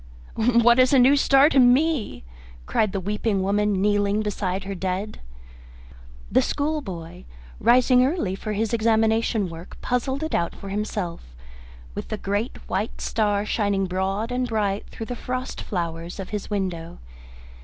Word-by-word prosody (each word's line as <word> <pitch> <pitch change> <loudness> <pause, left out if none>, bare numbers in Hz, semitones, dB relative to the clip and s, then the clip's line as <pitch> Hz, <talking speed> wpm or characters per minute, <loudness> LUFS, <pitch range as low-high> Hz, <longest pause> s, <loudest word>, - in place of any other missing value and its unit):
"What 235 +1 +4
is 255 +2 +5
a - - +6
new 260 +3 +6
star 275 0 +5
to 275 - +3
me?" 260 - +3 0.4
cried 215 - +1
the 195 - -2
weeping 205 +1 -1
woman, 205 0 +1
kneeling 205 +1 +1
beside 195 -2 -2
her 195 +1 -5
dead. 190 +3 -3 1.1
The - - +4
schoolboy, 210 - -3 0.3
rising 250 +1 +5
early 260 - 0
for 210 +2 -4
his 220 +2 -1
examination 220 -1 +2
work, 165 +1 -10
puzzled 265 +4 -1
it 315 - -4
out 170 - 0
for 195 - -9
himself 195 - -4 0.6
with - - -6
the 215 - -4
great 205 +4 -2
white 205 +4 -2
star 205 -2 0
shining 200 -3 0
broad 190 +5 -2
and 250 0 -1
bright 210 -3 -1
through 225 - -7
the 245 - -5
frost 255 +2 -4
flowers 170 -1 -4
of 190 - -6
his 210 -2 -5
window. 180 -5 -3
210 Hz, 150 wpm, -24 LUFS, 195-245 Hz, 1.1 s, a